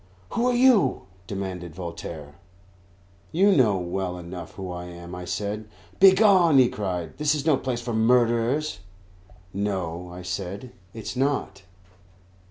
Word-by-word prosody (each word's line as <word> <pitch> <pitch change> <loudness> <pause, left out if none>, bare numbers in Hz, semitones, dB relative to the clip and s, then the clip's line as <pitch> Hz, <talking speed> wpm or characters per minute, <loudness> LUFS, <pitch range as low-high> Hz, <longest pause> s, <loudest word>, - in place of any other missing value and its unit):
"Who 240 +1 +1
are 250 - +2
you?" 240 - +4 0.2
demanded 95 -4 -5
Voltaire. 85 -4 -7 1.0
"You 195 +5 +4
know 110 -8 +4
well 90 0 -3
enough 90 0 -8
who 95 -2 -6
I 90 0 -6
am," 85 0 -10
I 90 0 -6
said. 105 +4 -3 0.3
"Begone!" 190 -5 +6
he 130 -2 +6
cried; 90 - -4
"this 150 0 +2
is 145 -1 -3
no 155 -3 +5
place 130 -2 -3
for 120 0 -4
murderers." 120 +5 +2 0.7
"No," 90 -3 -3
I 90 +1 -9
said, 95 +6 -5 0.2
"it 110 - -7
is - - -5
not." 130 -7 -1
105 Hz, 140 wpm, -25 LUFS, 90-135 Hz, 1.0 s, Begone